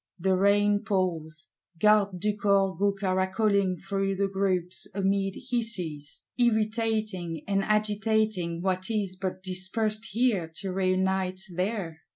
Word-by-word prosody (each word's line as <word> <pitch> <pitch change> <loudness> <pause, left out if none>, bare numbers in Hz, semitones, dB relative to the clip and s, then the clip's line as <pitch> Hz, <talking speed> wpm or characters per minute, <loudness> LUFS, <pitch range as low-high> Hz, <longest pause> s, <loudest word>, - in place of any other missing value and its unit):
The 190 +1 +2
rain 205 +1 +3
pours: 170 -4 -2 0.3
Gardes 205 -2 +4
du 210 +3 0
Corps 195 -2 +2
go 200 +4 +2
caracoling 190 0 +1
through 195 0 -1
the 200 +1 +1
groups 185 -2 -1
"amid 195 0 0 0.2
hisses;" 180 -12 -2 0.2
irritating 215 -7 0
and 195 -1 +1
agitating 210 -4 0
what 185 +1 0
is 205 -4 -1
but 185 0 -4
dispersed 210 +4 -1
here 215 -7 0
to 195 +1 -3
reunite 190 0 0
there. 180 -3 -2
195 Hz, 120 wpm, -27 LUFS, 185-210 Hz, 0.3 s, Gardes